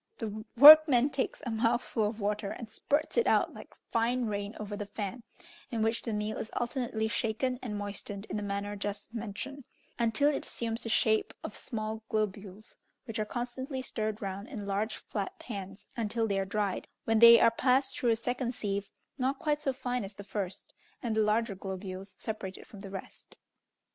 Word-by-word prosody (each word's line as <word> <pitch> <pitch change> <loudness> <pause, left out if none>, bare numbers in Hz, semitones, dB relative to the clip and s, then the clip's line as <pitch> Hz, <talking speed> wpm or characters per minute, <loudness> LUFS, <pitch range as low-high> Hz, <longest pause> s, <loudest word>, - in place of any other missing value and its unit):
The 215 -1 -4
workman 290 -1 +10
takes 270 -1 -2
a 240 - -2
mouthful 230 -1 +1
of 215 +1 -5
water, 205 0 -1
and 230 - -6
spurts 285 - -1
it 470 - +2
out - - +3
like - - -12 0.2
fine 240 +2 +1
rain 205 0 -3
over 210 -1 -4
the 205 0 -5
fan, 205 +3 -5 0.5
in 225 -2 -1
which 225 +1 +1
the 230 - -4
meal 210 0 -2
is 220 - -4
alternately 240 -3 -1
shaken 235 +3 -1
and 210 -4 -4
moistened 205 0 -5
in - - -5
the - - -2
manner 200 0 -3
just 205 +2 -5
mentioned, 235 +5 -5 0.4
until 235 +5 +3
it - - -2
assumes 230 0 -3
the 230 - -3
shape 220 -1 +2
of 210 - -6
small 220 -1 -4
globules, 210 -1 -3 0.3
which 225 -1 -4
are 215 - 0
constantly 260 +3 -4
stirred 215 -3 -3
round 195 +2 -4
in 215 -7 -6
large, 205 +3 -1
flat 200 -2 -5
pans 195 -2 -7
until 225 0 0
they 200 -2 0
are 195 - 0
dried, 200 -1 -1 0.2
when 225 -1 +2
they 235 0 +10
are 230 - +6
passed 255 +3 +2
through 245 - +1
a 225 - +4
second 245 +2 -2
sieve, 200 -2 -2 0.3
not 265 +2 +1
quite 300 0 0
so 270 - +1
fine 250 -2 -2
as 195 +1 -7
the 200 - -9
first, 195 -2 -5 0.3
and 230 -3 -1
the 220 - +3
larger 215 +1 +2
globules 190 0 -6
separated 205 -4 -5
from 205 - -12
the 195 0 -8
rest. 195 0 -9
220 Hz, 190 wpm, -31 LUFS, 205-240 Hz, 0.5 s, workman